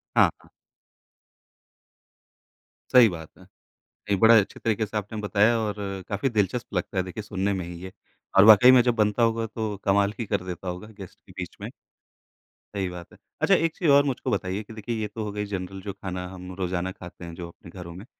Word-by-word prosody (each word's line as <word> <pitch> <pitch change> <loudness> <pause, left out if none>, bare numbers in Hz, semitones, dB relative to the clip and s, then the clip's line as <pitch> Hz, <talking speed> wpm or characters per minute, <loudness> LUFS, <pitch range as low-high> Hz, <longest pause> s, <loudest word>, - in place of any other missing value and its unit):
हाँ, - - +6
हाँ। - - -21 2.4
सही 120 -4 +8
बात 80 -3 -8
है। - - -16 0.7
एक 100 - +2
बड़ा 115 +2 +7
अच्छे 100 - -4
तरीके 110 -1 0
से 105 +1 -4
आपने 105 +2 -5
बताया 105 +3 +3
और 105 -2 -2 0.3
काफ़ी 105 +6 0
दिलचस्प 110 +1 -1
लगता 90 +1 -3
है 95 - +2
देखिए 95 +4 -7
सुनने 100 -2 -1
में 95 -3 -3
ही 85 0 -8
ये। 95 - -7 0.5
और 95 - +9
वाक़ई 110 +4 +9
में 130 - +7
जब 120 -2 +1
बनता 105 +1 +2
होगा, 115 0 +1
तो 110 -2 -4
कमाल 100 +1 +3
ही 115 - -2
कर 100 -2 -1
देता 90 0 -6
होगा 90 +4 -6
गेस्ट 95 -3 -11
के - - -16
बीच - - -6
में। - - -5 1.1
सही 95 -2 -1
बात 90 -1 -9
है। - - -17 0.2
अच्छा - - +5
एक 165 0 0
चीज़ 170 - 0
और 140 0 +6
मुझको 135 -3 -2
बताइए 95 +1 -2
कि 110 - -12
देखिए 115 +2 -4
ये 105 - -1
तो 110 - -3
हो 105 - -4
गई 105 0 -3
जनरल 95 -1 -5
जो 100 +1 -6
खाना 90 -2 -6
हम 90 0 -9
रोज़ाना 90 0 -2
खाते 90 -2 -11
हैं, 85 - -8
जो 85 -1 -7
अपने 85 - -15
घरों 85 -2 -9
में 95 +5 -10
100 Hz, 210 wpm, -25 LUFS, 90-110 Hz, 2.4 s, और